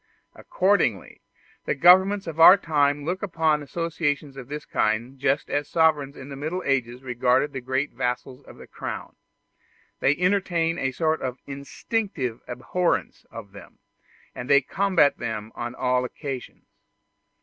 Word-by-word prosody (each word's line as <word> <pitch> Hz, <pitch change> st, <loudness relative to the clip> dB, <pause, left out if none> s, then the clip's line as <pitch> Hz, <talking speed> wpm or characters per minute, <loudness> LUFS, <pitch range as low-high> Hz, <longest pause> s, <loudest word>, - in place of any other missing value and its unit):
Accordingly, 185 Hz, -, 0 dB, 0.4 s
the -, -, 0 dB
governments 190 Hz, +6 st, +5 dB
of 165 Hz, -1 st, -7 dB
our 180 Hz, +4 st, +10 dB
time 145 Hz, -5 st, +1 dB
look 180 Hz, +3 st, -2 dB
upon 160 Hz, -6 st, +1 dB
associations 150 Hz, -2 st, -3 dB
of 135 Hz, -3 st, -9 dB
this 150 Hz, +1 st, -6 dB
kind 115 Hz, +5 st, -1 dB
just 140 Hz, +1 st, 0 dB
as 145 Hz, 0 st, -2 dB
sovereigns 150 Hz, -4 st, +2 dB
in 135 Hz, +1 st, -10 dB
the 140 Hz, -, -7 dB
Middle 160 Hz, +6 st, -4 dB
Ages 125 Hz, -2 st, -1 dB
regarded 125 Hz, +3 st, +1 dB
the 130 Hz, -, -5 dB
great 130 Hz, +3 st, -2 dB
vassals 125 Hz, +2 st, -3 dB
of -, -, -14 dB
the -, -, -12 dB
Crown: -, -, -7 dB, 0.8 s
they 140 Hz, -, +3 dB
entertain 180 Hz, -3 st, +1 dB
a 130 Hz, -, -1 dB
sort 160 Hz, +4 st, 0 dB
of 130 Hz, -1 st, -3 dB
instinctive 140 Hz, -, -4 dB
abhorrence 170 Hz, +8 st, -2 dB
of 110 Hz, -4 st, -10 dB
them, 100 Hz, -2 st, -14 dB, 0.6 s
and 125 Hz, +1 st, -7 dB
they 140 Hz, 0 st, +6 dB
combat 185 Hz, 0 st, +2 dB
them 110 Hz, -2 st, -5 dB
on 120 Hz, +1 st, -5 dB
all 125 Hz, -1 st, +1 dB
occasions. 130 Hz, 0 st, -7 dB
140 Hz, 145 wpm, -24 LUFS, 125-165 Hz, 0.8 s, our